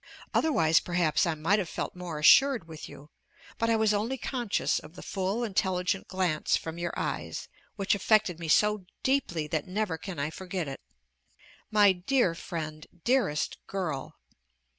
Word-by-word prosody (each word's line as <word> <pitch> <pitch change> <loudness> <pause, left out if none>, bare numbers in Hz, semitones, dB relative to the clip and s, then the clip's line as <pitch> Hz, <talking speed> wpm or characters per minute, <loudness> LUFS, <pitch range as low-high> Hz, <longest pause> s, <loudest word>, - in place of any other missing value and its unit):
Otherwise 165 - +4
perhaps 175 0 +1
I 165 - 0
might 170 +7 +2
have 180 -5 -3
felt - - -4
more 180 -3 -5
assured 240 - +6
with 160 -1 -9
you; 145 +2 -13 0.5
but 230 - +1
I 230 - +4
was 220 -1 +3
only 225 +6 -1
conscious 240 -4 -1
of 155 +3 -14
the - - -9
full, 195 +5 -2
intelligent 190 -3 0
glance 180 -5 +1
from 165 +1 -6
your 175 0 -2
eyes, - - -3 0.3
which 195 -2 +1
affected 200 -3 +2
me 165 - -5
so 210 +3 +3 0.2
deeply 260 - +1
that 160 +1 -2
never 185 -3 -2
can 190 -4 -7
I 145 +2 -2
forget 180 -1 -4
it. 135 - -6 0.9
My 210 -2 +6
dear 190 +2 +1
friend! 155 -2 -6 0.2
dearest 235 - +1
girl! 170 -9 -4
185 Hz, 160 wpm, -29 LUFS, 160-210 Hz, 0.9 s, assured